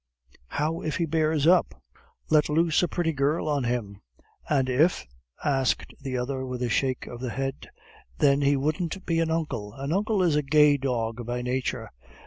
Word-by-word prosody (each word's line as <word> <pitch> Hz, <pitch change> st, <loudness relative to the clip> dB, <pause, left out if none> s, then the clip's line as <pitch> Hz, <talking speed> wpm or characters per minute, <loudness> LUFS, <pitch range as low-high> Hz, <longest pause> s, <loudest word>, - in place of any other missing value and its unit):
"How 155 Hz, -, -2 dB
if 155 Hz, -, -2 dB
he 170 Hz, -, +1 dB
bears 155 Hz, -1 st, +1 dB
up?" 175 Hz, -, +3 dB, 0.5 s
"Let 155 Hz, -1 st, +4 dB
loose 160 Hz, +1 st, +2 dB
a 180 Hz, -, +2 dB
pretty 170 Hz, -2 st, -1 dB
girl 145 Hz, +4 st, 0 dB
on 145 Hz, -4 st, 0 dB
him." 110 Hz, -5 st, -3 dB, 0.5 s
"And 135 Hz, -4 st, +2 dB
if 145 Hz, +8 st, +2 dB, 0.2 s
?" 60 Hz, -, -41 dB
asked 135 Hz, -3 st, 0 dB
the 135 Hz, -2 st, -3 dB
other, 130 Hz, +2 st, -3 dB
with 125 Hz, -1 st, -4 dB
a 120 Hz, -, 0 dB
shake 130 Hz, +3 st, 0 dB
of 120 Hz, -, -8 dB
the 125 Hz, 0 st, -3 dB
head. 135 Hz, +3 st, -4 dB, 0.5 s
"Then 140 Hz, 0 st, +3 dB
he 140 Hz, 0 st, +3 dB
wouldn't 155 Hz, +6 st, -2 dB
be 165 Hz, -1 st, +1 dB
an 165 Hz, -1 st, +1 dB
uncle 150 Hz, -11 st, -2 dB
an 140 Hz, +3 st, -3 dB
uncle 205 Hz, 0 st, +1 dB
is 165 Hz, -4 st, +2 dB
a 150 Hz, -, +3 dB
gay 150 Hz, +1 st, +4 dB
dog 120 Hz, -3 st, -2 dB
by 125 Hz, 0 st, -2 dB
nature." 125 Hz, +1 st, -2 dB
140 Hz, 185 wpm, -26 LUFS, 125-160 Hz, 0.5 s, Let